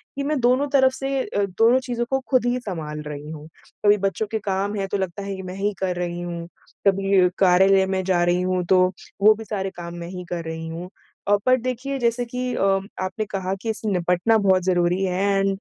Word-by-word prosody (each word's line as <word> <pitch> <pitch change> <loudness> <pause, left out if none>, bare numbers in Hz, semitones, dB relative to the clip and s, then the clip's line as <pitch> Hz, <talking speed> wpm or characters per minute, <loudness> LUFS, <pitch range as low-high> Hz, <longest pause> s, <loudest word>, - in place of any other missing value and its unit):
कि 280 - -2
मैं 295 0 0
दोनों 255 +4 +3
तरफ 265 -1 +5
से 270 +1 -2
अ, 205 - -1
दोनों 225 +7 +3
चीज़ों 245 -2 -3
को 265 - +1
खुद 255 -3 +3
ही 245 +1 +1
संभाल 160 -9 -5
रही 150 0 -7
हूँ। 155 -1 -9 0.4
कभी 205 0 +6
बच्चों 210 +2 -3
के 220 - -1
काम 200 0 -2
हैं 195 -1 -2
तो - - +1
लगता 190 0 -4
है 200 0 -4
कि 190 - -7
मैं 185 0 -7
ही 205 +2 -1
कर 185 -2 -1
रही 175 -1 -3
हूँ, 170 -1 -5 0.4
कभी 195 -1 +4
कार्यालय 190 +1 +5
में 190 - -1
जा 180 -2 +2
रही 175 +1 +2
हूँ 185 0 0
तो 185 -1 +6 0.4
वो 215 +2 +8
भी 225 - -8
सारे 195 -3 -3
काम 170 0 -7
मैं 170 0 -6
ही 180 0 -7
कर 170 -1 -3
रही 160 0 -5
हूँ। 170 +2 -6 0.4
अ, 205 - +5
पर 255 0 +6
देखिए 255 +3 -3
जैसे 235 0 +1
कि 250 +1 -3
अ, - - -2 0.4
आपने 185 +3 -2
कहा 195 -2 -3
कि 225 - -4
इससे 220 0 -2
निपटना 180 +4 +2
बहुत 190 -3 +3
ज़रूरी 180 0 +1
है 185 0 -1 0.2
एंड 195 - +2
195 Hz, 225 wpm, -23 LUFS, 180-225 Hz, 0.4 s, वो